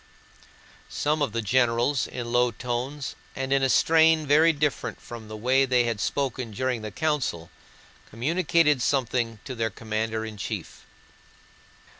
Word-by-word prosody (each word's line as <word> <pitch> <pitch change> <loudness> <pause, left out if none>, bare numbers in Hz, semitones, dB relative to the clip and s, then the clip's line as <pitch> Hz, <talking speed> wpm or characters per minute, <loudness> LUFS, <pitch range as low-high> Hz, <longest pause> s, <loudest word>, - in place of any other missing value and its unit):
Some 150 +1 -1
of 140 - +1
the 115 +1 -2
generals, 120 +4 +2
in 120 -2 -6
low 120 0 +3
tones 125 +4 -4 0.2
and 135 0 -1
in 135 - +3
a 135 - +2
strain 160 +3 +4
very 155 +3 +5
different 150 -3 -2
from 115 -2 -10
the 110 0 -7
way 130 +5 +3
they 125 -2 +3
had 115 -3 -2
spoken 130 +1 -2
during 125 +2 -2
the 110 - -5
council, 125 - -2 0.6
communicated 150 +3 +2
something 120 -4 0
to 130 - -5
their 115 -2 -1
commander 110 0 -3
in 110 -1 -8
chief. 105 - -6
125 Hz, 145 wpm, -26 LUFS, 115-145 Hz, 0.6 s, very